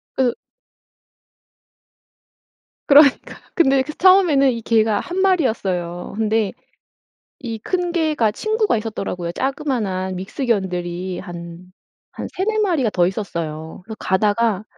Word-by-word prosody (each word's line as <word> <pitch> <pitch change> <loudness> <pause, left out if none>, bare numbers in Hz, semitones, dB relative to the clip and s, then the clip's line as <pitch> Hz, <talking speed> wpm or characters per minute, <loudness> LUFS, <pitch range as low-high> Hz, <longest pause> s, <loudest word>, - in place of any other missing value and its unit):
그래서 250 -3 +1 2.5
그러니까요. 285 -1 +5 0.2
근데 270 -5 +3
그 305 +3 -7
처음에는 350 -8 +5
이 230 -2 -4
개가 220 -2 +2
1 360 +1 -4
마리였어요. 200 - 0
근데 220 -2 0 0.9
이 230 -4 -5
큰 355 - -2
개가 305 -10 +1
친구가 435 - 0
있었더라고요. 195 -5 -4
자그마한 220 - -2
믹스견들이 185 -4 -2
한 175 0 -9 0.5
한 - - -5
3-4 430 +4 -1
마리가 320 - +1
더 175 -2 +2
있었어요. 165 -5 -5
그래서 220 +3 -9
가다가 205 +1 +1
225 Hz, 255 characters per minute, -20 LUFS, 185-290 Hz, 2.5 s, 그러니까요